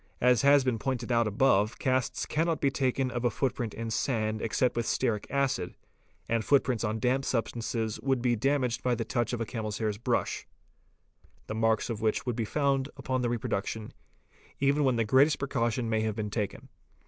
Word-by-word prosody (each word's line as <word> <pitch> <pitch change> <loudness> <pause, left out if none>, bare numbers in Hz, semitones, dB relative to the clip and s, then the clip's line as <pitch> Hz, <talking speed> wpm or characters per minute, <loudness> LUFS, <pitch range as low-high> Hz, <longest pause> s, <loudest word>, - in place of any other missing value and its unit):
As 125 -2 +4
has 140 0 +6
been 125 -3 0
pointed 125 -1 -2
out 115 -1 +3
above 105 0 +2
casts 130 -2 0
cannot 165 +1 0
be 140 - +2
taken 130 -1 0
of 120 - -2
© - - -8
a - - +2
footprint 120 -3 -2
in 115 0 -4
the - - -5
sand 110 -2 -1
except 120 +2 +1
with 120 -1 -1
stearic 115 -5 0
acid, 130 -10 -1 0.5
and 115 -1 0
footprints 130 -4 +2
on 110 -1 -1
damp 130 +4 +1
substances 115 -3 -2
would 135 -1 +1
be 120 0 +2
damaged 125 -1 0
by 125 -1 +1
the 115 -1 -3
touch 120 -1 -1
of 120 - -2
a - - 0
camel's 110 -1 -4
hair 110 -2 0
brush, - - -1 1.0
the - - -5
marks 110 0 +1
of 110 -2 -4
which 110 -1 0
would 125 -3 -1
be 115 -2 -1
found 140 +2 0
upon 130 -1 -1
the 120 - 0
reproduction 110 -2 -3 0.7
even 140 +2 +2
when 130 -3 +3
the 115 -1 +1
greatest 135 +6 +4
precaution 120 -3 -1
may 110 -1 +1
have 110 -1 -1
been 105 -2 -3
taken. 105 -3 -4
120 Hz, 195 wpm, -29 LUFS, 110-130 Hz, 1.0 s, has